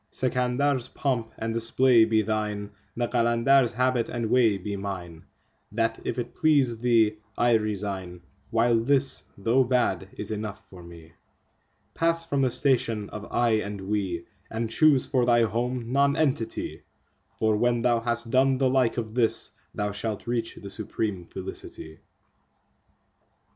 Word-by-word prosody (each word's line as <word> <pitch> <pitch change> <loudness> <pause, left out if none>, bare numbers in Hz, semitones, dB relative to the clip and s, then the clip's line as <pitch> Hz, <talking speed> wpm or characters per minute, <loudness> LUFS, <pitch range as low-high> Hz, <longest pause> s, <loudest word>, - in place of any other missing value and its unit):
Sikandar's3 130 +1 0
pomp 120 -5 -1
and 115 0 -3
display 115 +1 +4
be 110 -1 +2
thine, 105 -1 -2 0.3
the 120 0 0
Qalandar's4 120 +2 +3
habit 125 0 +1
and 115 -2 -3
way 115 -5 +4
be 100 +2 -5
mine; 90 -5 -6 0.5
That, 115 +1 -1
if - - -3
it 120 - -4
please 140 -8 +2
thee, 115 -3 +3 0.2
I 120 0 +3
resign, 100 -5 -2 0.3
while 115 0 +3
this, 135 +3 +1 0.2
though 115 +6 +3
bad, 120 -7 0
is 105 - -3
enough 105 -1 -5
for 90 -2 -11
me. 85 -1 -13 0.8
Pass 165 0 +1
from 140 -4 0
the 130 - +3
station 115 -6 0
of 105 0 -8
"I" 120 -1 +2
and 105 -1 -4
"We," 95 -3 -2 0.2
and 115 0 -3
choose 145 +1 +4
for 130 -2 +1
thy 120 -1 +5
home 120 +2 -2
Nonentity, 140 -4 0 0.6
For 110 -1 +2
when 120 +1 +1
thou 120 -1 +3
has 120 0 0
done 130 +3 +2
the 130 -1 +2
like 130 -3 +2
of 110 -2 -3
this, 115 -2 +1 0.2
thou 105 0 -1
shalt 105 +1 -4
reach 115 -1 -2
the 100 - -9
supreme 105 -4 -3
Felicity. 80 -3 -8
115 Hz, 145 wpm, -26 LUFS, 105-125 Hz, 0.8 s, thy